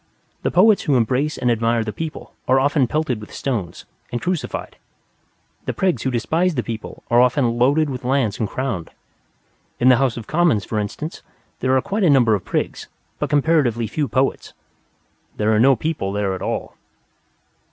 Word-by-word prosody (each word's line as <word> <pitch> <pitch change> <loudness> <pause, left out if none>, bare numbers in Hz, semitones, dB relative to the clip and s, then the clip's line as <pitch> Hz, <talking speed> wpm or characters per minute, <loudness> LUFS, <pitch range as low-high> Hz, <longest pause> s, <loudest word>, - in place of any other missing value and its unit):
The - - 0
Poets 200 +4 +5
who 145 -5 +1
embrace 130 +6 0
and 125 -1 +1
admire 115 0 +1
the 105 -1 -5
people 160 -1 -6
are 130 +1 +4
often 140 -1 +2
pelted 145 -5 -1
with 105 - -11
stones 105 -11 -4 0.3
and 120 - -2
crucified. 180 +1 -3 0.9
The - - -2
Prigs 180 -11 0
who 130 - 0
despise 160 +9 0
the 125 - -1
people 115 -2 -7
are 120 +1 +6
often 125 -1 +2
loaded 145 +5 +3
with 130 -3 -5
lands 125 -5 0
and 110 - -1
crowned. 120 -11 -3 0.9
In 125 - +5
the 125 - +6
House 130 -3 +1
of 115 - -6
Commons, 155 - +2
for 110 - -2
instance, 130 +10 -5 0.4
there 130 0 +2
are - - +2
quite 205 +1 -1
a 175 - +5
number 125 -6 +5
of 100 -3 -1
prigs, - - -3 0.3
but - - -1
comparatively 145 -6 +2
few 140 +7 -2
poets. 130 +1 -1 0.8
There 110 +1 +2
are 105 - +3
no 135 +3 +6
People 155 -10 -2
there 100 -2 -1
at 95 - -6
all. - - -3
130 Hz, 180 wpm, -21 LUFS, 115-150 Hz, 0.9 s, are